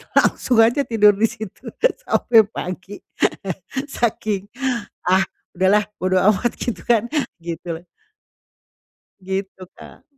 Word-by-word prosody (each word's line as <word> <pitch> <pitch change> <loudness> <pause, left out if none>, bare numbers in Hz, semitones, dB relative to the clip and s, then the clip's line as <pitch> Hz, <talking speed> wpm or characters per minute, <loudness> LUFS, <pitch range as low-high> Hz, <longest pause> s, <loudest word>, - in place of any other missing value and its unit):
langsung 230 -3 +4
aja 235 +5 +3
tidur 210 -3 +6
di 210 +3 +2
situ, 220 -3 -9 0.4
sampai 225 -4 +4
pagi. 185 -1 -6 0.9
Saking, 210 -5 -1 0.6
"Ah, 190 +1 +5 0.3
udahlah, 190 +3 +4 0.2
bodo 185 0 +1
amat!" 210 +5 +3
gitu, 200 -9 -3
kan. 230 -2 +4 0.4
Gitu 170 +1 -6
lho. 165 - -10 1.4
Gitu, 190 0 -4
Kak. - - -14
205 Hz, 105 wpm, -21 LUFS, 185-225 Hz, 1.4 s, tidur